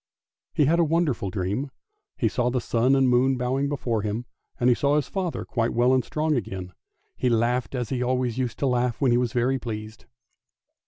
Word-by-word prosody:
He 150 - +2
had 165 +4 +3
a - - +5
wonderful 155 - 0
dream; 100 +8 -2 0.5
he 115 - +2
saw 125 +3 0
the 125 +1 0
sun 120 +3 +2
and 135 -1 +3
moon 125 +2 +3
bowing 130 +3 0
before 120 -6 -1
him, 110 +4 -3 0.3
and 120 - +2
he 125 - +6
saw 140 +3 +1
his 150 -3 +1
father 185 -4 -3
quite 115 -1 -1
well 125 +2 +4
and 130 -1 +3
strong 155 +5 -1
again; 95 -7 -4 0.4
he 125 - 0
laughed 120 +3 +1
as 125 -3 -2
he 125 -2 -2
always 125 -1 0
used 125 -3 -2
to - - -1
laugh 125 -2 0
when 135 -4 +3
he 120 - +4
was 125 -2 0
very 125 +3 +1
pleased. 110 -2 -7
125 Hz, 205 wpm, -25 LUFS, 115-135 Hz, 0.5 s, he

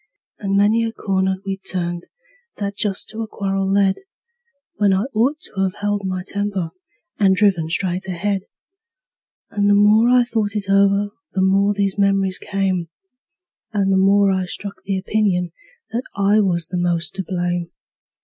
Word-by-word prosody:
And 195 -2 0
many 215 +3 +3
a 225 - -1
corner 190 -3 0
we'd 195 0 -4
turned 175 -1 -3 0.5
that 200 -1 -3
just 200 -2 -1
to 225 - -5
a 225 - -3
quarrel 195 -2 -2
led, 195 -1 +3 0.8
When 200 -2 +3
I 190 +2 +1
ought 255 +8 +1
to 195 -1 -2
've 185 - -16
held 205 -1 -2
my 185 -1 -3
temper, 200 -5 -2 0.5
and 195 -2 +4
driven 185 -5 +2
straight 185 +2 -1
ahead; 190 +2 -2 1.0
And 205 0 +1
the 205 - +5
more 210 +3 +5
I 250 0 +5
thought 220 -3 -2
it 200 -2 -2
over 200 +1 +3 0.2
the 190 - +1
more 200 +2 +3
these 200 0 -1
memories 195 -1 +2
came, 190 -4 -1 0.8
And 195 -2 +1
the - - +3
more 195 +1 +4
I 190 -1 0
struck 200 +3 -6
the 195 -1 -2
opinion 190 -3 0 0.4
that 240 +3 -2
I 200 +1 +3
was 175 -5 0
the 180 - -3
most 175 -1 0
to 190 - -2
blame. 175 -1 -2
195 Hz, 165 wpm, -20 LUFS, 190-205 Hz, 1.0 s, the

